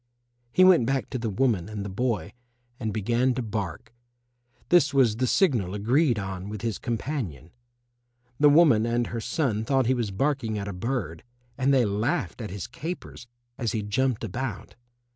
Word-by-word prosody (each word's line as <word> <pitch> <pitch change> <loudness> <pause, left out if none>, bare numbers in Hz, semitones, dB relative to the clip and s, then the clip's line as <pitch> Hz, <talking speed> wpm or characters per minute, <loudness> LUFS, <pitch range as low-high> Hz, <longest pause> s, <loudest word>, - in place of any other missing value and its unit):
He 185 - +5
went 180 -11 +6
back 135 0 -1
to 130 - -2
the 115 -1 -2
woman 105 -3 0
and 105 -2 -5
the 95 -2 -7
boy 115 -4 -1 0.5
and 110 -3 -2
began 120 +5 +1
to 125 - -2
bark. 105 0 -5 0.8
This 150 -6 +4
was 120 -5 +4
the 130 +1 +1
signal 115 - +2
agreed 120 +5 +2
on 95 -1 -5
with 105 +1 -6
his 115 -3 -2
companion. 115 - -4 0.9
The 145 0 +7
woman 145 -8 +5
and 120 0 +1
her 115 0 -4
son 115 - -1
thought 135 +2 +2
he 130 - +3
was 120 -4 -1
barking 120 0 -1
at 100 -1 -4
a 100 - -4
bird, 90 - -3 0.3
and 135 +2 +1
they 130 -3 +4
laughed 110 - -1
at 110 - -5
his 100 +1 -5
capers 135 0 -7 0.3
as 115 -4 -1
he 110 -2 -1
jumped 120 +4 0
about. 115 0 -5
115 Hz, 175 wpm, -26 LUFS, 105-135 Hz, 0.9 s, The